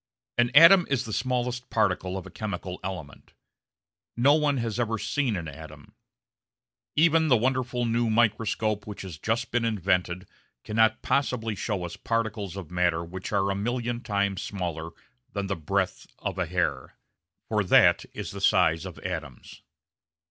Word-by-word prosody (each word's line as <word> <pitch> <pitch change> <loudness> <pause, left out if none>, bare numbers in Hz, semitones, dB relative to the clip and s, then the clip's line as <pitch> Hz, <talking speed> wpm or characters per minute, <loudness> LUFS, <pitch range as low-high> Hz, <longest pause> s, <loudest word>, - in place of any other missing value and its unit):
An 120 0 +4
atom 170 +4 +9
is 135 -4 0
the 110 - -5
smallest 125 +2 -2
particle 95 -3 0
of 95 - -7
a 95 - -11
chemical 100 -3 -5
element. 90 -7 -7 0.8
No 135 +4 +5
one 150 -2 +2
has 115 -1 -2
ever 115 -1 0
seen 130 0 -1
an 85 -3 -4
atom. 75 0 -11 1.0
Even 160 +1 +4
the 130 -5 +5
wonderful 125 0 0
new 115 0 +1
microscope 110 -1 +1
which 105 -2 -7
has 85 -6 -8
just 115 +7 -1
been 120 -1 +1
invented 95 -4 0 0.4
cannot 110 +1 +2
possibly 125 -5 0
show 100 -2 -3
us 85 - -7
particles 110 -5 -2
of 95 -4 -8
matter 90 -2 +1
which 90 +2 -7
are 100 -1 +1
a - - -1
million 120 +3 -2
times 100 -3 -1
smaller 85 -5 -4 0.4
than 100 -1 -2
the 95 0 -2
breadth 95 +4 -2
of - - -4
a 90 - 0
hair; 85 -7 -2 0.5
for - - +1
that - - +5
is - - -6
the - - -7
size 80 +3 +3
of 90 - -10
atoms. 80 -8 -6
105 Hz, 155 wpm, -27 LUFS, 90-120 Hz, 1.0 s, atom